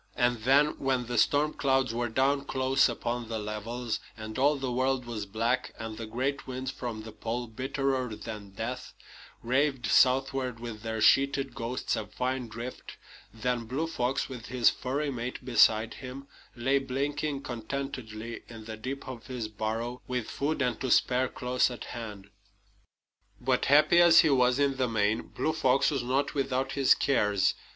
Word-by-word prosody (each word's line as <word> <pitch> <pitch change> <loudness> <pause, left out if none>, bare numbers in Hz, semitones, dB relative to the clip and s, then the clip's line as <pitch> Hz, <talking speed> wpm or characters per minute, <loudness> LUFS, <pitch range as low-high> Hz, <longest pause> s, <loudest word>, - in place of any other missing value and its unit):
And 120 -2 +2
then, 135 +6 +3
when 130 -2 0
the 120 -1 0
storm 145 +6 +3
clouds 135 -3 +1
were 120 0 -1
down 140 +4 +1
close 130 0 +2
upon 120 0 -3
the 115 - -2
levels, 110 +3 -3 0.2
and 110 +2 -6
all 145 +3 +4
the 135 -2 -3
world 130 0 0
was 110 -4 -5
black, 115 +5 -1
and 110 -1 -6
the 115 0 -6
great 130 +5 -2
winds 130 0 -4
from 120 -5 -5
the 110 - -8
Pole, 120 +3 -3
bitterer 130 0 -2
than 105 -2 -8
death, 120 +6 -6 0.5
raved 130 +1 +1
southward 130 -1 +3
with 115 -3 -7
their 110 0 -3
sheeted 135 +2 +4
ghosts 125 -1 -2
of 105 -1 -6
fine 125 -1 -1
drift 115 +3 -8 0.3
then 120 +1 -2
Blue 135 +8 -2
Fox, 135 -5 -1
with 125 -4 -8
his 125 -1 +4
furry 140 +3 -2
mate 125 0 -5
beside 110 -3 +4
him, 130 +1 -8 0.3
lay 130 +3 +2
blinking 140 +2 -2
contentedly 115 -2 -5
in 115 -2 -10
the 110 -1 -6
deep 135 +5 -6
of 125 -3 -8
his 125 -4 -4
burrow, 110 +3 -3
with 125 -3 -3
food 145 0 -1
and 125 0 -1
to 130 - -1
spare 130 +1 +3
close 125 +1 0
at 125 - -7
hand. 105 -4 -8 1.1
But 125 0 +1
happy 150 +4 +6
as 170 -1 +8
he 160 - +3
was 125 -1 +4
in 140 -1 +1
the 130 -2 +1
main, 110 -1 +1
Blue 155 - -1
Fox 135 -4 +3
was 140 -3 0
not 130 +3 0
without 135 -1 -1
his 135 -1 +4
cares. 105 -8 +2
125 Hz, 170 wpm, -29 LUFS, 115-135 Hz, 1.1 s, as